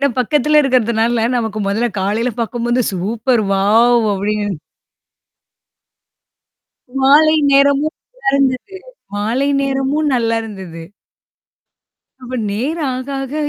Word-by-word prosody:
ஏன்னா 280 - +2
பக்கத்தில 300 +4 +2
இருக்கிறதினால, 235 -3 +1
நமக்கு 220 -3 -3
மொதல்ல 225 +5 0
காலையில 215 +6 -1
பாக்கும்போது, 240 +2 -1
சூப்பர் 225 +5 0
வாவ் 225 +4 +3
அப்படிங்குற 205 +1 -2 2.5
மாலை 305 +3 +5 0.2
நேரமும் 280 +2 +3 0.2
நல்லாருந்துது 275 - -1 0.4
மாலை 230 +7 -1
நேரமும் 275 +2 0
நல்லா 230 -2 0
இருந்தது. 190 -6 -9 1.4
அப்ப 255 0 -8 0.2
நேரம் 280 +8 -2
ஆக 260 +2 -6
ஆக 270 +2 -7
240 Hz, 95 wpm, -17 LUFS, 220-275 Hz, 2.5 s, மாலை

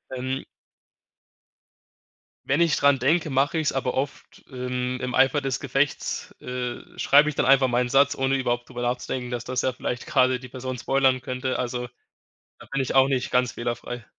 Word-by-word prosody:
ähm. 130 +1 -3 2.0
Wenn 145 +5 +2
ich 165 -2 +3
dran 140 -1 +4
denke, 155 +5 +2
mach 135 +1 +1
ich's, 160 -3 +1
aber 130 -2 -1
oft 135 +2 -4
im 125 0 -3
im 125 -1 -3
Eifer 135 +2 +3
des 135 -1 -2
Gefechts, 135 +1 -1
äh, 125 -1 -4 0.2
schreibe 145 +2 +5
ich 150 - -5
dann - - +1
einfach 135 0 +5
meinen 120 0 +1
Satz, 140 +2 +4
ohne 135 0 +1
überhaupt 120 -2 -2
drüber 120 -2 -6
nachzudenken, 125 +1 -2
dass 120 -2 -4
das 130 +1 -2
ja 130 - 0
vielleicht 125 -1 -4
grade 130 -4 +3
die 130 - -10
Person 130 0 -5
spoilern 130 0 +2
könnte. 130 +1 -3
Also, 125 0 -3 0.7
da - - -14
bin 135 - 0
ich 130 - -3
auch 135 0 +6
nicht 130 -2 -1
ganz 125 -1 +2
fehlerfrei. 120 0 -5
130 Hz, 180 wpm, -25 LUFS, 125-135 Hz, 2.0 s, auch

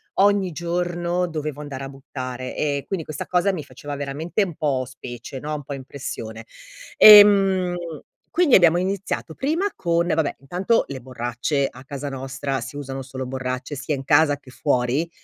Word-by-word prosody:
ogni 200 -1 +3
giorno 175 +1 -1
dovevo 155 -3 -4
andare 140 -2 -6
a - - -5
buttare, 130 -2 -6
ehm, 145 -2 -1
quindi 185 -5 -3
questa 155 -2 -5
cosa 180 +2 +2
mi 155 - -4
faceva 145 0 -8
veramente 145 +7 -2
un 175 -5 -5
po' 140 -4 0
specie, 125 0 -8
no, 150 +3 -4
un 145 - -6
po' 140 - -6
impressione. 115 -4 -7 0.5
Ehm, 195 -4 +8 0.5
quindi 345 -7 +4
abbiamo 175 -2 +6
iniziato 190 -3 -3
prima 320 +9 0
con 170 0 +1
vabbè 160 -4 0
intanto 180 - +1
le 135 -2 -6
borracce 125 +3 -2
a 125 - -13
casa 140 0 -5
nostra 135 +1 -3
si - - -7
usano 135 -1 -5
solo 130 0 -6
borracce 130 +2 -4
sia 140 +2 -2
in 135 - -6
casa 145 0 +4
che 135 -2 -16
fuori, 130 +4 0
145 Hz, 165 wpm, -23 LUFS, 135-175 Hz, 0.5 s, Ehm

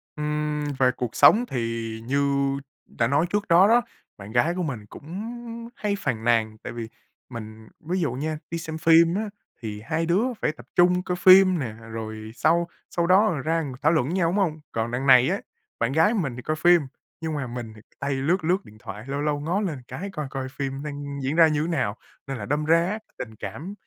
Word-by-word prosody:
Ừm. 150 0 -2 0.2
Về 130 -1 +5
cuộc 125 -2 -5
sống 240 +3 +6
thì 115 - -3
như 140 +2 +1 0.5
đã 115 - -1
nói 145 +6 +2
trước 205 +2 -1
đó 180 +3 +6
đó, 240 +2 +5 0.4
bạn 100 +1 -10
gái 125 +8 +2
của 180 - -1
mình 125 -9 -4
cũng 190 - -7 0.4
hay 205 -1 -1
phàn 110 - -2
nàn, 110 -2 +2
tại - - -6
vì 115 -1 -5 0.4
mình 110 -2 -9
ví 180 +4 -2
dụ 145 -7 0
nha, 155 +4 -3
đi 170 - -2
xem 160 -1 -5
phim 165 +2 +5
á 215 +1 -2 0.3
thì 105 -2 -5
hai 160 +6 -1
đứa 180 +7 +2 0.2
phải - - +1
tập - - -15
trung 180 +1 +4
coi 180 - -2
phim 185 -1 +7
nè, 120 -5 -3
rồi 110 -1 -7
sau 170 +4 +2 0.2
sau 170 -1 0
đó, 195 +4 +5
ờ, 155 -8 -1
ra 165 +3 0 0.2
thảo 155 - +4
luận 155 -4 +1
nhau, 175 -2 +1
đúng 185 - -1
hông? 160 -6 0
Còn 115 +1 -2
đằng 130 +3 -2
này 130 -1 +7
á, - - -1 0.4
bạn 115 +2 +1
gái 160 +10 +4
của 225 - 0
mình 135 -9 -2
thì 125 - -7
coi 155 +5 -2
phim 175 +1 +5 0.4
nhưng 160 -1 -2
mà 140 -3 -3
mình 120 -2 -6
thì 110 - -14 0.2
tay 140 0 -1
lướt, 155 +7 0
lướt 185 +4 +1
điện 110 - -15
thoại, 105 +2 -8
lâu 140 +1 -2
lâu 150 -1 0
ngó 175 +7 -1
lên 155 -10 -3
cái, 170 +11 -6
coi 150 -2 -4
coi 135 -1 -4
phim 135 +1 -4
đang 145 -1 -5
diễn 140 +4 -1
ra 165 -1 +7
như 155 +1 0
nào. 125 -11 -1 0.3
Nên 135 -2 -4
là 100 - -5
đâm 150 +4 -1
ra 165 +1 +4
á, 215 +2 -3 0.2
tình 110 -2 -7
cảm 140 - -7
150 Hz, 225 wpm, -25 LUFS, 120-170 Hz, 0.5 s, phim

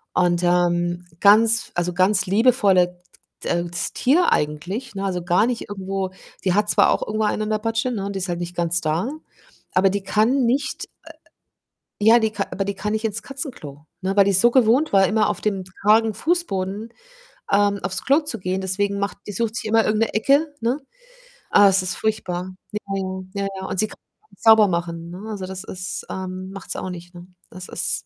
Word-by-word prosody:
und, 175 -1 +2
ähm, 175 0 +1
ganz 220 +2 +5
also, 175 0 -1
ganz 190 +2 +2
liebevolle 195 -4 +3 0.4
t - - -4
äh, 175 0 0
ts 175 - -2
Tier 325 +8 +3
eigentlich, 180 - -2
ne? 195 0 -3
Also, 180 -2 -2
gar 175 +4 +3
nicht 240 -4 -3
irgendwo 195 -1 -3 0.3
die 185 -2 +2
hat 210 0 +2
zwar - - +5
auch - - 0
irgendwo 215 +1 0
einen 210 +1 0
an 215 - -3
der 215 - +1
Patsche, 225 +3 -1
ne, 205 -5 -3
und 200 - -4
die - - -2
ist 185 - -3
halt 175 -1 -2
nicht 175 0 -5
ganz 170 0 +1
da, 160 +9 -1 0.6
aber 190 +1 +4
die 200 0 -2
kann 235 +7 +2
nicht, 260 +3 -1 0.2
äh - - -12 1.0
ja, 230 +2 +7
die 220 -1 0
ka 205 -2 -2
aber 195 0 -2
die 200 - -3
kann 210 +2 -3
nicht 220 +1 -2
ins 220 +1 -3
Katzenklo, 195 - -7 0.2
ne? 190 +1 -1
Weil 200 - +6
die's 195 -2 +3
so 240 0 +5
gewohnt 255 +4 +3
war, 195 -1 +5
immer 215 -1 +2
auf 210 - -3
dem 195 -3 -1 0.2
kargen 220 +1 +4
Fußboden, 215 - -2 0.6
ähm, 200 0 +3
aufs 195 -1 -3
Klo 280 +4 +4
zu 295 -8 -5
gehen, 185 +1 -2
deswegen 200 +2 -1
macht 200 0 -3
die 205 - -5
sucht 230 +1 -2
sich - - -3
immer 225 +1 +3
irgend 215 +1 +1
'ne 225 - -1
Ecke, 280 +7 +2
ne? 240 +4 0 0.7
Ah, 205 -1 +7
es 195 0 +3
ist 185 - -2
furchtbar. 185 -4 -2 0.2
Ja, 210 - -3 0.2
ja. 190 - -2 0.4
Ja, - - -1
ja. - - -5
Und 190 - -3
sie 215 - +2
kann - - -13 0.3
nicht - - -21
sauber 220 -2 +7
machen, 170 -1 -3
ne? 180 +2 -8
Also, 200 -4 -5
das 190 0 -6
ist 185 0 -5
ähm, 185 0 -5
macht 195 0 -9
sie - - -3
auch 185 - -4
nicht, 175 0 -10
ne? 175 +1 -12 0.2
Das 185 0 -9
ist - - -2
200 Hz, 210 wpm, -22 LUFS, 185-220 Hz, 1.0 s, ja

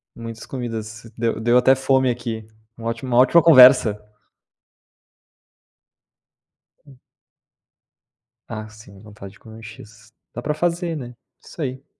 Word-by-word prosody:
Muitas 115 -1 -9
comidas. 115 -3 -7
Deu 115 -1 -2
deu 120 +2 +3
até 130 +2 +4
fome 130 -1 +1
aqui. 115 -2 -5 0.3
Uma 115 0 -7
ótima 115 +2 -5
uma 120 - +1
ótima 165 +6 +4
conversa. 125 -8 +6 2.8
Hum. 135 -3 -19 1.5
Ah, 110 -1 -7
sim, 105 -2 -16
vontade 105 -2 -13
de - - -22
comer 110 0 -14
X. 110 +1 -15 0.2
Dá - - -7
pra 150 +4 -2
fazer, 170 +1 -2
né. 125 -4 -9 0.3
Isso 165 - -11
aí. 130 -1 -5
120 Hz, 125 wpm, -20 LUFS, 110-130 Hz, 2.8 s, conversa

